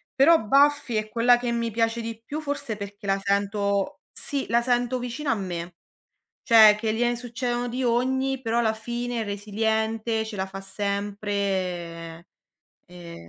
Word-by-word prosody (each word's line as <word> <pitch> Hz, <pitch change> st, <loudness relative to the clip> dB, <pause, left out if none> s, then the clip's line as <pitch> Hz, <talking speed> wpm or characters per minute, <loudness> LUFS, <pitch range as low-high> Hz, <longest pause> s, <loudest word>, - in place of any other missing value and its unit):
Però 320 Hz, +5 st, +6 dB
Buffy 280 Hz, 0 st, +3 dB
è 215 Hz, 0 st, -1 dB
quella 240 Hz, +2 st, +4 dB
che 240 Hz, -1 st, -2 dB
mi 235 Hz, -1 st, -1 dB
piace 230 Hz, +1 st, 0 dB
di 225 Hz, 0 st, -6 dB
più, 300 Hz, +2 st, -4 dB
forse 285 Hz, -6 st, -3 dB
perché 200 Hz, 0 st, -8 dB
la 195 Hz, 0 st, +1 dB
sento 200 Hz, 0 st, 0 dB
sì, 280 Hz, -2 st, -3 dB
la 235 Hz, +1 st, +3 dB
sento 245 Hz, +1 st, +1 dB
vicina 250 Hz, +3 st, -3 dB
a -, -, +2 dB
me. 175 Hz, -3 st, -5 dB, 0.7 s
Cioè, 220 Hz, -3 st, +8 dB
che 220 Hz, -1 st, -1 dB
gliene 240 Hz, +1 st, +1 dB
succedono 240 Hz, 0 st, -3 dB
di 255 Hz, +2 st, -3 dB
ogni, 260 Hz, +2 st, +1 dB
però 230 Hz, 0 st, 0 dB
alla 220 Hz, -2 st, +2 dB
fine 240 Hz, +1 st, -4 dB
è -, -, -1 dB
resiliente, 220 Hz, +2 st, -1 dB
ce 220 Hz, -1 st, -7 dB
la 190 Hz, 0 st, -2 dB
fa 195 Hz, 0 st, -8 dB
sempre. 195 Hz, -4 st, -3 dB, 0.6 s
Eh, 170 Hz, -, -11 dB
225 Hz, 160 wpm, -25 LUFS, 200-240 Hz, 0.7 s, Cioè